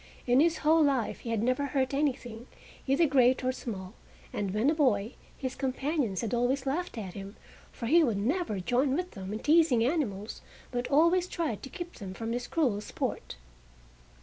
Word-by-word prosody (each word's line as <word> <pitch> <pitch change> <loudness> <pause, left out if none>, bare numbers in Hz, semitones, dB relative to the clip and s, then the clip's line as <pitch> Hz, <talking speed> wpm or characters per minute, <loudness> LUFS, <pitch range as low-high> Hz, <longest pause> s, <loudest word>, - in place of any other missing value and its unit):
In 245 +1 +4
his 330 +2 +3
whole 320 +1 +5
life 270 -6 +1
he 235 - -7
had 225 -2 0
never 255 +3 +1
hurt 265 -1 0
anything, 255 -5 -2 0.4
either 275 +5 +4
great 260 -3 +3
or 255 - +2
small, 200 -7 -6 0.4
and 200 -2 -2
when 215 +9 +2
a - - +2
boy, 245 -8 +1 0.2
his 260 -1 -3
companions 270 - -1
had 230 -1 -3
always 250 +3 +1
laughed 295 +1 -2
at 190 -5 -5
him, 195 0 -8 0.4
for 235 - -7
he 325 +8 +5
would 230 -8 +1
never 235 - -1
join 255 +8 +1
with 360 +2 -2
them 195 -2 -7
in 215 - -2
teasing 295 -4 +4
animals, 230 - -2 0.3
but 245 -1 -2
always 335 +5 +4
tried 315 - -3
to 270 - -8
keep 350 +3 -8
them 190 -2 -7
from 225 +2 -4
this 245 +1 -3
cruel 250 -11 +1
sport. - - -4
255 Hz, 185 wpm, -29 LUFS, 220-295 Hz, 0.4 s, whole